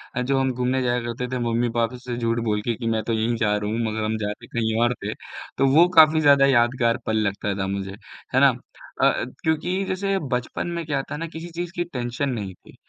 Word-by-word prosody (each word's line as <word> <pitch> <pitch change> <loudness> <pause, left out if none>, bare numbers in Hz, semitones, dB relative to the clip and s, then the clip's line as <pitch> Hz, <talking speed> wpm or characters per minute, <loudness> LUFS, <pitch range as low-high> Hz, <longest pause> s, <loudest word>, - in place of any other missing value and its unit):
अ, 125 - 0
जो 135 +1 +1
हम 130 -1 +1
घूमने 125 +1 0
जाया 120 0 +1
करते 120 +1 -4
थे 125 - -1
मम्मी-पापा 115 +1 0
से 125 -1 -6
झूठ 115 0 0
बोल 105 -1 0
के 115 +1 -1
कि 115 0 -5
मैं 110 -2 0
तो 115 - -2
यहीं 115 +2 0
जा 105 -2 +1
रहा 105 0 -3
हूँ, 115 - -1
मगर 110 0 -3
हम 110 0 -1
जाते 105 -1 -5
कहीं 110 -1 -1
और 120 +1 +2
थे - - -2 0.4
तो 135 - +3
वो 170 +2 +7
काफ़ी 155 0 +8
ज़्यादा 140 -2 +6
यादगार 120 -2 +3
पल 110 0 0
लगता 100 0 -2
था 95 - -1
मुझे। 95 0 -3 0.4
है - - +6
ना? - - +7 0.5
अ - - +5
अ, - - +2 0.2
क्योंकि 180 +5 0
जैसे 195 +1 -1 0.2
बचपन 125 +7 -3
में 165 - -3
क्या 145 -2 -1
होता 135 - -4
है 150 - -4
ना, 165 - -3
किसी 165 +2 -8
चीज़ 175 +1 -4
की 175 - 0
टेंशन 125 -2 -3
नहीं 105 -6 -4
थी, - - -19
120 Hz, 240 wpm, -23 LUFS, 110-140 Hz, 0.5 s, काफ़ी